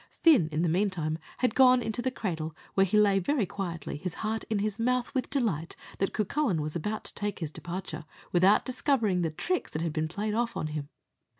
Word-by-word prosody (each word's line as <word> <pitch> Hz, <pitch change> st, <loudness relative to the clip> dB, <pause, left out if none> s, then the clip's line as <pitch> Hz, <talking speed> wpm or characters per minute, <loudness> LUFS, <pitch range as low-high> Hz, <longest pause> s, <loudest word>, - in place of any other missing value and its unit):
Fin, 280 Hz, -, +4 dB
in 155 Hz, +2 st, 0 dB
the -, -, +2 dB
meantime, 165 Hz, -3 st, 0 dB, 0.2 s
had 250 Hz, -3 st, +1 dB
gone 255 Hz, -1 st, +6 dB
into 225 Hz, 0 st, -2 dB
the 260 Hz, -, 0 dB
cradle, 165 Hz, -, -4 dB, 0.2 s
where 195 Hz, 0 st, +4 dB
he 210 Hz, -, +2 dB
lay 200 Hz, -2 st, +5 dB
very 235 Hz, +4 st, +1 dB
quietly, 170 Hz, -7 st, -5 dB
his 180 Hz, +2 st, -5 dB
heart 220 Hz, +1 st, -1 dB
at 215 Hz, -2 st, +1 dB
his 210 Hz, +1 st, -2 dB
mouth 250 Hz, +2 st, 0 dB
with 260 Hz, -2 st, -1 dB
delight 215 Hz, -, -1 dB, 0.2 s
that 195 Hz, -, +1 dB
Cucullin 215 Hz, -, 0 dB
was 150 Hz, +1 st, -3 dB
about 210 Hz, +6 st, -2 dB
to -, -, -4 dB
take 205 Hz, -1 st, -3 dB
his 160 Hz, -4 st, -4 dB
departure, 175 Hz, -2 st, -6 dB, 0.3 s
without 185 Hz, +3 st, +5 dB
discovering 245 Hz, -8 st, +1 dB
the 165 Hz, -, +1 dB
tricks 360 Hz, -, -2 dB
that 155 Hz, -, -3 dB
had 165 Hz, -2 st, -1 dB
been 155 Hz, 0 st, 0 dB
played 210 Hz, +6 st, -3 dB
off 235 Hz, +1 st, 0 dB
on -, -, -2 dB
him. 145 Hz, -2 st, -4 dB
195 Hz, 210 wpm, -29 LUFS, 165-230 Hz, 0.3 s, gone